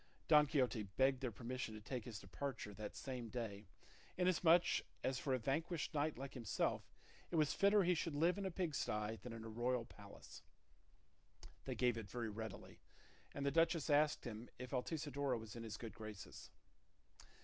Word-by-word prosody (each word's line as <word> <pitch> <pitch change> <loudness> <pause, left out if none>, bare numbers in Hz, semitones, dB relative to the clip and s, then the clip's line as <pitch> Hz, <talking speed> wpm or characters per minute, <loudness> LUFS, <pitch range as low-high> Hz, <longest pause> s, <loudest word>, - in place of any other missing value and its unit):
Don 150 -1 +7
Quixote 130 -6 +2
begged 130 +7 +2
their 125 -3 -1
permission 115 +2 -4
to - - -6
take 120 +2 -4
his 115 -4 -5
departure 105 +2 -5
that 105 +1 -6
same 125 -4 -4
day, 105 -4 -4 0.5
inasmuch 180 -1 +6 0.4
as 130 0 0
for 135 - -2
a 130 - +4
vanquished 145 +6 -1
knight 150 -1 +1
like 135 +1 -6
himself 115 -6 -1 0.4
it - - -3
was 155 -2 +4
fitter 200 0 +5
he 180 +1 +4
should 165 -2 -1
live 170 +6 +3
in 200 - -2
a - - -1
pig 175 -3 -1
sty 105 -3 -1
than 125 - -7
in 115 -1 -6
a - - -6
royal 120 +2 0
palace. 100 -2 -12 1.2
They - - -2
gave 120 -2 +2
it 100 -3 -8
very 115 0 -3
readily, 110 +1 -7 0.6
and 140 - -2
the 140 - +3
duchess 165 0 +3
asked 150 +1 +4
him 115 0 -6
if 125 0 -7
Altisidora 140 -1 0
was 110 -1 -8
in 115 - -5
his 110 -1 -5
good 115 -2 -6
graces. 110 -3 -8
125 Hz, 180 wpm, -41 LUFS, 110-150 Hz, 1.2 s, Don